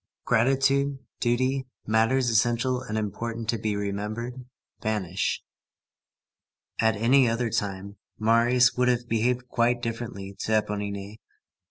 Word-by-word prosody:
Gratitude, 135 Hz, +3 st, +2 dB, 0.2 s
duty, 130 Hz, +2 st, 0 dB, 0.2 s
matters 115 Hz, +3 st, +2 dB
essential 120 Hz, +3 st, +2 dB
and 110 Hz, -4 st, -4 dB
important 115 Hz, +2 st, -3 dB
to 115 Hz, -, +1 dB
be 105 Hz, 0 st, -1 dB
remembered, 105 Hz, +5 st, -4 dB, 0.4 s
vanish. 100 Hz, -4 st, -1 dB, 1.4 s
At 110 Hz, -1 st, +3 dB
any 120 Hz, +4 st, +4 dB
other 115 Hz, 0 st, -1 dB
time, 100 Hz, 0 st, -3 dB, 0.2 s
Marius 120 Hz, +3 st, +4 dB
would 125 Hz, 0 st, +1 dB
have 120 Hz, -1 st, +1 dB
behaved 120 Hz, +2 st, 0 dB
quite 120 Hz, 0 st, +1 dB
differently 115 Hz, -4 st, -5 dB
to 110 Hz, -, -1 dB
Éponine. 105 Hz, -1 st, -2 dB
115 Hz, 115 wpm, -26 LUFS, 105-125 Hz, 1.4 s, any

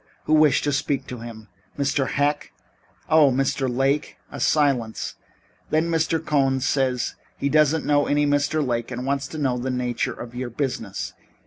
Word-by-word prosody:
Who 155 Hz, -, 0 dB
wished 155 Hz, -2 st, +5 dB
to 145 Hz, -, +1 dB
speak 140 Hz, -1 st, -1 dB
to 125 Hz, -, -6 dB
him? 115 Hz, -2 st, -9 dB, 0.3 s
Mr. 140 Hz, -1 st, +1 dB
Heck? 145 Hz, +1 st, 0 dB, 0.6 s
Oh, 155 Hz, -3 st, +6 dB
Mr. 135 Hz, 0 st, 0 dB
Lake! 135 Hz, +4 st, 0 dB
A -, -, -7 dB
silence. 135 Hz, -7 st, +1 dB, 0.6 s
Then 160 Hz, +2 st, +1 dB
Mr. 165 Hz, 0 st, +1 dB
Cohn 135 Hz, -2 st, +2 dB
says 130 Hz, -2 st, 0 dB, 0.2 s
he 140 Hz, -, -1 dB
doesn't 155 Hz, +1 st, +3 dB
know 145 Hz, -1 st, +3 dB
any 145 Hz, 0 st, +2 dB
Mr. 145 Hz, +1 st, +1 dB
Lake 120 Hz, -1 st, -1 dB
and 125 Hz, 0 st, -5 dB
wants 140 Hz, 0 st, -1 dB
to 155 Hz, -, -8 dB
know 130 Hz, -4 st, 0 dB
the 130 Hz, +2 st, -3 dB
nature 125 Hz, -2 st, -1 dB
of 120 Hz, 0 st, -9 dB
your 125 Hz, 0 st, -4 dB
business. 115 Hz, -6 st, -3 dB
140 Hz, 165 wpm, -23 LUFS, 125-145 Hz, 0.6 s, Oh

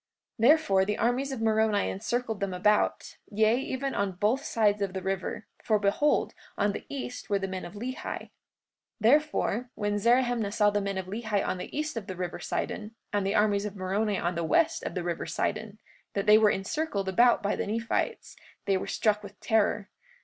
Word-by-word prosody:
43:52 230 Hz, -, +6 dB
Therefore 230 Hz, -11 st, +4 dB
the 210 Hz, +2 st, -1 dB
armies 245 Hz, +5 st, 0 dB
of 260 Hz, -4 st, -4 dB
Moroni 220 Hz, -2 st, +2 dB
encircled 225 Hz, +2 st, -2 dB
them 195 Hz, -2 st, -2 dB
about, 210 Hz, +3 st, +1 dB
yea, 215 Hz, +2 st, +3 dB
even 270 Hz, 0 st, -3 dB
on 200 Hz, -1 st, -1 dB
both 210 Hz, +9 st, +1 dB
sides 210 Hz, -2 st, +1 dB
of 195 Hz, -2 st, -1 dB
the 190 Hz, -, -3 dB
river, 190 Hz, +2 st, -3 dB, 0.2 s
for 215 Hz, -, +3 dB
behold, 210 Hz, +9 st, +1 dB, 0.2 s
on 205 Hz, 0 st, +2 dB
the -, -, -7 dB
east 130 Hz, -3 st, -6 dB
were 200 Hz, -, +2 dB
the 195 Hz, -1 st, -3 dB
men 190 Hz, -1 st, -5 dB
of 175 Hz, -, -10 dB
Lehi. 245 Hz, +5 st, -4 dB
43:53 -, -, -5 dB, 0.7 s
Therefore 250 Hz, -1 st, +2 dB
when 205 Hz, 0 st, -1 dB
Zerahemnah 240 Hz, -1 st, +2 dB
saw 210 Hz, -1 st, +4 dB
the 205 Hz, 0 st, 0 dB
men 195 Hz, -1 st, -2 dB
of 190 Hz, -, -3 dB
Lehi 210 Hz, +1 st, -2 dB
on 185 Hz, -, -2 dB
the 180 Hz, -, -6 dB
east 305 Hz, -2 st, -2 dB
of 215 Hz, -, -5 dB
the 185 Hz, -, -5 dB
river 180 Hz, -1 st, -4 dB
Sidon, 220 Hz, +1 st, -4 dB, 0.2 s
and 200 Hz, -1 st, +1 dB
the 200 Hz, -, 0 dB
armies 210 Hz, -1 st, +2 dB
of 210 Hz, -1 st, -5 dB
Moroni 200 Hz, +2 st, -1 dB
on 175 Hz, 0 st, -1 dB
the 170 Hz, -1 st, -2 dB
west 330 Hz, -, +2 dB
of -, -, -5 dB
the 180 Hz, -, -2 dB
river 170 Hz, -1 st, -3 dB
Sidon, 215 Hz, 0 st, -2 dB, 0.4 s
that 200 Hz, -, 0 dB
they 215 Hz, +1 st, +7 dB
were 215 Hz, -1 st, +5 dB
encircled 205 Hz, 0 st, -2 dB
about 235 Hz, +5 st, +4 dB
by 205 Hz, -, +1 dB
the -, -, -3 dB
Nephites, 230 Hz, -, -2 dB, 0.3 s
they 195 Hz, -1 st, +2 dB
were -, -, -5 dB
struck 210 Hz, -1 st, +1 dB
with 205 Hz, -1 st, -12 dB
terror. 210 Hz, -2 st, +1 dB
210 Hz, 200 wpm, -28 LUFS, 195-230 Hz, 0.7 s, they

